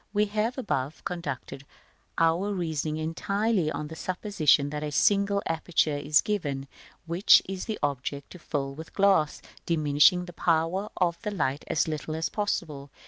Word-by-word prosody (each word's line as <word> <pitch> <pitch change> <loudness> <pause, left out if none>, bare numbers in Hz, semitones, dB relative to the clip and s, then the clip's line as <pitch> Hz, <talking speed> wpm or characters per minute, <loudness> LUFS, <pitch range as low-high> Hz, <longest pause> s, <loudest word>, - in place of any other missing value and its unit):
We 210 0 +3
have 215 +4 -1
above 150 - -3
conducted 140 -6 -5 0.5
our 165 +5 +2
reasoning 160 -5 -2
entirely 185 +3 0
on 150 - -4
the 160 - -9
supposition 160 -6 +1
that 150 0 -4
a 150 -1 -3
single 200 +5 +2
aperture 165 -2 0
is 145 +1 +3
given, 145 -10 -2 0.4
which 170 +4 +6
it 190 - -5
is 185 - -5
the 220 -2 -3
object 140 0 -3
to 180 - -11
fill 135 -3 -3
with 160 +3 -10
glass, 195 -7 +2 0.2
diminishing 155 +3 +4
the 175 - -10
power 170 +5 0
of 170 -2 0
the 210 - -3
light 145 -8 -1
as 160 - +1
little 155 0 -4
as 160 +1 -1
possible. 155 -9 -3
165 Hz, 160 wpm, -27 LUFS, 150-195 Hz, 0.5 s, which